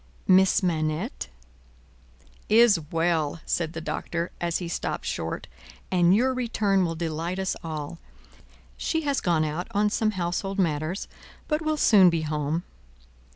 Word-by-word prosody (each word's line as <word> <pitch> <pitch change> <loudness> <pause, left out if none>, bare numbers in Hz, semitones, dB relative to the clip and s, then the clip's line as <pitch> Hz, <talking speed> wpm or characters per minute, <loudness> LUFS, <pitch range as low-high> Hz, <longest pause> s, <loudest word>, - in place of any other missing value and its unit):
"Miss 190 +1 +5
Manette 160 - -1 0.7
" 65 0 -29
"Is 220 -7 +5
well," 165 -2 0
said 165 -2 -1
the 160 - -5
Doctor, 170 +2 -3
as 170 -1 0
he 175 - -5
stopped 170 - -3
short, - - -3 0.5
"and 180 0 +4
your 260 +4 +2
return 220 -6 +1
will 165 -1 -1
delight 165 +2 -3
us 190 -1 -1
all. 160 0 -5 0.8
She 320 - -1
has 285 -3 0
gone 165 -3 +2
out 155 +4 -3
on 210 0 +2
some 220 0 +1
household 185 +3 -2
matters, 165 0 -1 0.4
but 300 +1 0
will 310 -1 0
soon 200 -10 +6
be 165 -2 -1
home." 150 +2 -2
175 Hz, 145 wpm, -26 LUFS, 160-195 Hz, 0.8 s, soon